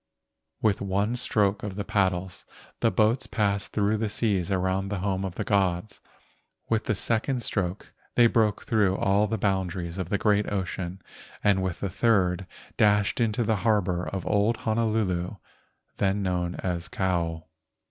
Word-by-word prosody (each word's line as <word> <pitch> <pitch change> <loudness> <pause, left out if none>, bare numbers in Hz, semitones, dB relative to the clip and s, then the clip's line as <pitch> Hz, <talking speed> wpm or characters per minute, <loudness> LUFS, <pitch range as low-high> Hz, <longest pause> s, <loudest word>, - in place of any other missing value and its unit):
With 105 -3 +2
one 100 +4 0
stroke 105 -4 +1
of 100 -2 -5
the 100 0 -4
paddles 95 -2 0 0.4
the 115 - +3
boats 110 +5 +2
passed 100 -3 0
through 105 +1 +1
the 110 0 -1
seas 100 -4 0
around 95 0 0
the 100 - -2
home 95 0 -1
of 95 -2 -4
the - - -2
gods. 100 0 0 0.7
With 110 -1 0
the 110 - +1
second 120 +5 0
stroke 95 -2 -2 0.2
they 120 - +6
broke 110 -3 +2
through 105 -7 +2
all 100 +2 +2
the 110 +2 -1
boundaries 95 -3 -1
of 90 -2 -3
the 100 - +1
great 105 -1 +2
ocean 95 -2 -3 0.4
and 100 -2 +3
with 95 -2 -3
the 100 - -1
third 95 -4 +2 0.3
dashed 105 +2 +3
into 115 +1 +1
the 110 -1 +1
harbor 95 -4 +1
of 95 -2 -4
old 105 +2 +2
Honolulu, 110 -5 0 0.6
then 100 +1 +1
known 90 -1 -1
as 90 -2 -3
Kou. 85 -4 -1
100 Hz, 155 wpm, -26 LUFS, 95-110 Hz, 0.7 s, they